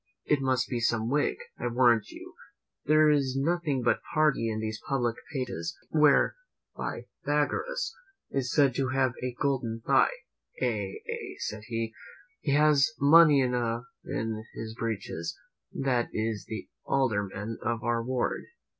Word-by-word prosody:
It 145 -2 +2
must 130 -2 +1
be 120 - -2
some 115 0 +1
Whig, 145 +1 +1 0.2
I - - -1
warrant 120 -2 +3
you. - - -11 0.5
There 155 +1 +5
is 135 -3 +1
nothing 150 -3 0
but - - +3 0.2
party 150 -7 +3
in 110 0 -2
these 110 0 -4
public 120 -4 +1 0.2
papers." 125 - -3
Where 150 - +4 0.4
Pythagoras 470 - -2 0.4
is 130 -3 -1
said 140 -4 +4
to 135 +1 0
have 130 -1 +1
a 125 -1 -3
golden 125 -5 -1
thigh, - - +5 0.5
"Ay, 105 -6 -2
ay," - - -5
said 105 0 -4
he, 115 -1 -3 0.5
"he 140 - -1
has 150 0 +4
money 150 0 +7
enough 120 -2 0 0.2
in 110 0 -3
his 110 0 -5
breeches; 110 -7 -4 0.3
that 125 -3 0
is 110 -1 -2
the 110 - -6 0.2
alderman 110 -4 -1
of 115 0 -2
our 120 -1 0
ward." 125 0 -1
125 Hz, 140 wpm, -29 LUFS, 115-140 Hz, 0.5 s, money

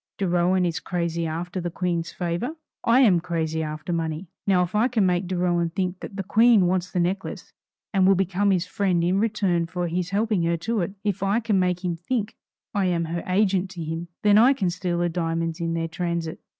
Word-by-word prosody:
De 195 - -1
Rohan 180 +1 +2
is 170 -2 -1
crazy 170 -2 -2
after 175 +3 -4
the 175 - -2
Queen's 170 -1 -2
favor. 175 - -3 0.3
I 240 +3 +5
am 195 -9 +5
crazy 160 -2 -2
after 155 +2 -4
money. 165 +1 -2 0.2
Now 185 -2 +4
if 175 - -5
I 215 +3 +3
can 225 -6 +1
make 180 0 +1
De 185 0 -2
Rohan 175 -1 +1
think 180 +1 -2
that - - -8
the 195 - -3
Queen 220 0 +5
wants 180 0 0
the 180 - -2
necklace, 185 +3 -3 0.4
and 190 -1 +4
will 195 - +6
become 195 +2 +1
his 185 -2 +2
friend 180 -3 0
in 180 +3 +2
return 195 -6 +1
for 175 0 -3
his 175 +1 -2
helping 210 -1 +1
her 170 0 +1
to 210 +6 -1
it; 185 +3 -3
if 205 -2 -1
I 200 +3 +2
can 215 -4 +1
make 180 0 0
him 175 -1 0
think 210 +5 -3 0.4
I 200 -2 +1
am 170 -2 0
her 170 +1 -3
agent 190 0 +2
to 170 - -3
him, 165 +2 -4 0.2
then 205 0 +6
I 250 +5 +6
can 195 -10 -1
steal 180 -1 -2
the 175 0 +1
diamonds 165 -1 -2
in 165 0 -1
their 165 0 -1
transit. 170 -1 -3
180 Hz, 220 wpm, -24 LUFS, 170-195 Hz, 0.4 s, will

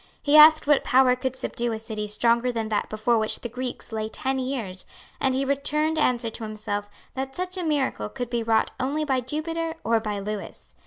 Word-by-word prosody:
He 290 +1 +2
asked 310 +1 +9
what 295 -1 +4
power 255 0 +4
could 260 0 -3
subdue 240 -2 -2
a - - -2
city 220 -1 -5
stronger 235 +3 +2
than 225 -2 -3
that 210 -1 -1
before 220 +2 +1
which 220 0 -1
the 240 - -5
Greeks 250 0 -6
lay 220 -1 -3
ten 265 +2 -2
years; 240 -8 -3 0.4
and 265 -1 +1
he 270 +1 0
returned 300 +3 0
answer 240 -5 +1
to 225 - -6
himself 210 -1 -4 0.2
that 265 0 -5
such 365 +1 -3
a 370 - -2
miracle 275 - -1
could 245 -1 -5
be 235 -1 0
wrought 225 -1 +2
only 285 +4 -1
by 265 -3 +1
Jupiter 325 +5 -3
or 230 0 +2
by 210 -2 -3
Lewis. 205 +1 -6
250 Hz, 205 wpm, -25 LUFS, 220-280 Hz, 0.4 s, asked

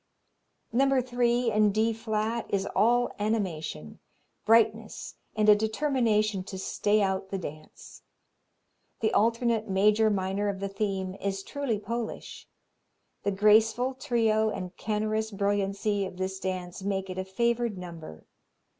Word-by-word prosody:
No. 270 +2 +3
3 245 -1 +1
in 210 -1 +3
D 220 +2 +1
flat 220 +1 -2
is 195 -1 0
all 240 +4 +3
animation, 175 - -3 0.5
brightness 225 -1 +2 0.2
and 215 -1 +2
a 210 - +10
determination 215 -3 +1
to 190 - -7
stay 205 +2 +1
out 190 0 -1
the 195 - -2
dance. 155 -4 -10 1.0
The 220 - +1
alternate 230 -1 +1
major 210 +3 +4
minor 200 0 -1
of 195 -1 -4
the 200 0 -3
theme 195 -2 -2
is 195 0 -2
truly 280 -4 -2
Polish. 225 +2 -5 0.7
The - - 0
graceful 220 +5 +4
trio 225 -4 +1
and 185 -3 -5
canorous 215 0 -1
brilliancy 200 0 0
of 185 - -11
this 190 +1 -3
dance 185 -1 -4
make 195 -1 -2
it 185 0 -5
a - - -1
favored 235 +2 0
number. 165 - -9
210 Hz, 130 wpm, -28 LUFS, 190-225 Hz, 1.0 s, a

